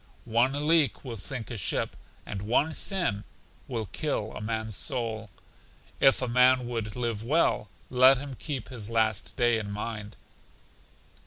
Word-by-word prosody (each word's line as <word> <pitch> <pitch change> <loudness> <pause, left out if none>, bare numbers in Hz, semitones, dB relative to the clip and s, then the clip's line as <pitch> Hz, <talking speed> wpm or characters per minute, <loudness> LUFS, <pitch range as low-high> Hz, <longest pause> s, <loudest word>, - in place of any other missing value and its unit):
One 130 +6 +1
leak 160 -4 +3
will 120 -3 -5
sink 115 0 -5
a 120 - -4
ship, - - -1 0.3
and 100 -2 -5
one 130 +9 +1
sin 175 - 0 0.4
will 115 -4 -3
kill 110 - -2
a - - -6
man's 110 -1 -2
soul. 110 -2 -2 0.7
If 135 -1 +5
a - - 0
man 125 +1 +4
would 115 -3 -4
live 115 -4 -2
well, 125 - +1 0.2
let 130 +1 +7
him 140 +1 -6
keep 130 -1 -5
his 115 -5 -6
last 110 -2 0
day 120 -3 +3
in 105 -2 -5
mind. 105 0 -5
120 Hz, 150 wpm, -28 LUFS, 110-130 Hz, 0.7 s, let